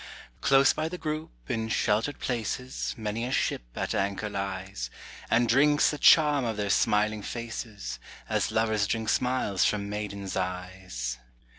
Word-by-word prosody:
Close 135 0 +5
by 155 +1 -2
the 180 - -5
group, 155 -2 -3 0.2
in 110 -1 -2
sheltered 110 +6 +1
places, 125 +2 -3
Many 110 +1 -3
a 125 - -2
ship - - 0
at - - -2
anchor 100 +2 -1
lies, 95 -9 -4 0.4
And 120 +1 +3
drinks 145 +5 +4
the 150 - -5
charm 150 -3 +6
of 115 -3 -2
their 100 -1 0
smiling 105 +1 +2
faces, 110 - -5 0.3
As - - 0
lovers 110 -2 +1
drink 110 0 -1
smiles 125 -7 +1
from 100 -1 0
maidens' 100 -2 -4
eyes. 90 -10 -4
110 Hz, 145 wpm, -28 LUFS, 100-125 Hz, 0.4 s, charm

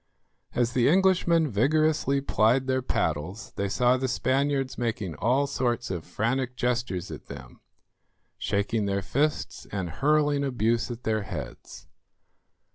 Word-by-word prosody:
As 120 0 +1
the 125 -1 +3
Englishmen 175 -2 +3
vigorously 140 +4 +2
plied 125 0 +2
their 130 0 0
paddles 80 - -2
they 100 0 -1
saw 125 +5 +3
the 130 +1 -1
Spaniards 135 +1 0
making 110 -7 -2
all 130 +5 +2
sorts 120 -5 -1
of 85 -4 -4
frantic 125 +6 -1
gestures 120 -8 -1
at - - -9
them, 65 -3 -11 0.8
shaking 100 +1 0
their 100 0 -1
fists 150 +8 -1
and 95 -4 -3
hurling 145 - +2
abuse 120 -3 0
at 120 0 -7
their 110 -1 0
heads. - - -8
125 Hz, 130 wpm, -27 LUFS, 105-140 Hz, 0.8 s, the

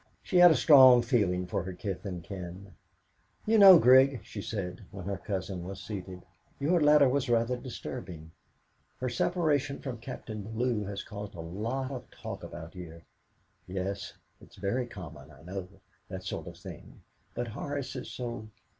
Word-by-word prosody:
she 185 - 0
had 175 0 +9
a 160 - +4
strong 130 -2 +8
feeling 100 -7 +1
for 90 - -2
her 95 +1 -6
kith 100 +1 -5
and 90 -3 -6
kin. 95 +1 -8 0.7
"You 220 0 +4
know, 195 -3 +11
Grig," 130 -1 +6
she 100 - -7
said, 95 -2 -5
when 95 -3 -9
her 100 -1 -3
cousin 95 -3 -4
was 95 +2 -7
seated, 95 -3 -7 0.4
"your 165 +5 +2
letter 150 -1 +6
was 135 0 0
rather 115 +1 +2
disturbing. 105 - -8 0.7
Her 130 - -1
separation 145 0 0
from 125 -4 -6
Captain 115 -3 -7
Bellew 110 +1 -2
has 100 0 -5
caused 105 -1 -8
such - - -12
a 80 - -6
lot 115 +10 -3
of 130 -3 -7
talk - - -8
about 85 -1 -9
here. 85 -2 -10 0.6
Yes; 95 +1 -4 0.3
it's - - -17
very 120 +6 -2
common, 80 - -10
I 75 0 -16
know, 90 +1 -6 0.4
that 95 0 -6
sort - - -5
of - - -9
thing, - - -12 0.3
but 120 -1 -3
Horace 140 +4 -5
is 125 - -6
so 120 -3 -5
105 Hz, 170 wpm, -29 LUFS, 95-130 Hz, 0.7 s, know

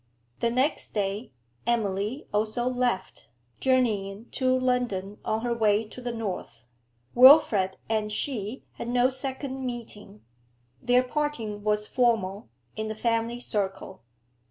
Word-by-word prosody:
The 235 - +2
next 260 +3 0
day, 205 +2 -2 0.4
Emily 215 +2 -1
also 220 +4 0
left, 245 - -1 0.3
journeying 220 -5 0
to 255 -1 +2
London 245 -6 -1
on 220 +1 -1
her 240 0 0
way 215 -1 +2
to 250 - -10
the 245 0 -3
north, 200 - -5 0.5
Wilfrid 245 -8 +7
and 215 -1 -1
she 220 0 -3
had - - -5
no 245 +2 +3
second 265 0 -4
meeting; 225 - -7 0.6
their 245 +1 +4
parting 250 -7 -3
was 210 0 +1
formal, 215 - 0 0.3
in 220 0 -3
the 215 - -4
family 230 +1 0
circle. 195 - -3
230 Hz, 125 wpm, -27 LUFS, 210-250 Hz, 0.6 s, Wilfrid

